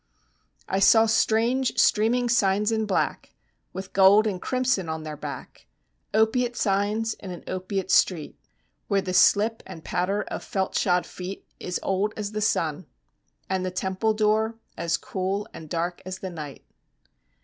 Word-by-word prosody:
I 190 - 0
saw 225 +3 +6
strange 230 +4 +2
streaming 240 +3 +3
signs 210 -2 +2
in 220 -1 0
black 195 - -1 0.4
With 190 0 -7
gold 200 +3 +6
and 190 -4 -2
crimson 250 -9 0
on 160 0 -4
their 155 -1 -6
back - - -8 0.4
Opiate 235 +3 +2
signs 210 +2 0
in 195 - -8
an 180 - -8
opiate 185 0 -3
street; 170 -5 +2 0.5
Where 200 -2 +1
the 185 - -3
slip 215 +4 +4
and 175 -4 -10
patter 195 +4 -1
of - - -6
felt 190 -1 -2
shod 180 -1 +2
feet 185 +2 -8
Is 180 - -3
old 195 +2 0
as 210 -1 -3
the 215 0 -3
sun; 160 -7 0 0.6
And 190 -1 -1
the 185 - -1
temple 190 +4 -1
door 215 +1 +1 0.2
As 170 -1 0
cool 195 +2 -3
and 160 -1 -10
dark 175 +2 -2
as 185 0 -6
the 190 -1 -6
night. 150 -5 -8
195 Hz, 155 wpm, -25 LUFS, 185-220 Hz, 0.6 s, saw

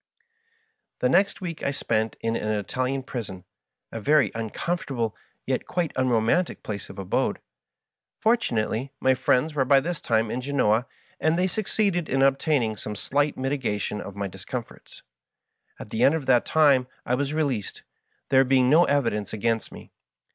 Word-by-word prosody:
The 125 - +1
next 195 +7 +2
week 170 -3 -5
I - - 0
spent 110 -5 -1
in 115 0 -1
an 105 - -2
Italian 130 +6 -2
prison, 100 -8 -6 0.5
a 115 - -5
very 145 -2 +3
uncomfortable 115 +1 -3 0.3
yet - - -2
quite 175 -4 -1
unromantic 130 +7 +1
place 100 -2 -6
of - - -11
abode. 95 -2 0 0.8
Fortunately, 135 - 0
my 130 - +4
friends 130 +4 +1
were 140 -3 +2
by 135 +1 +5
this 165 +3 -4
time 110 -1 +1
in 125 - -2
Genoa, 125 -4 +1 0.3
and 160 +1 +2
they 180 - +2
succeeded 190 -3 0
in 135 +1 +2
obtaining 135 -4 +2
some 105 +1 -6
slight 145 +6 0
mitigation 125 -7 -2
of 100 - -8
my 100 0 -3
discomforts. 95 +6 -8 0.8
At - - -9
the 110 - -2
end 145 - +5
of 155 -4 -3
that 125 -2 +3
time 140 -5 +4 0.2
I 125 - 0
was 140 +2 0
released, 135 -10 -2 0.5
there 135 0 +6
being 130 -1 +3
no 170 +3 +6
evidence 115 -8 0
against 115 +1 -1
me. - - -12
130 Hz, 155 wpm, -25 LUFS, 110-150 Hz, 0.8 s, there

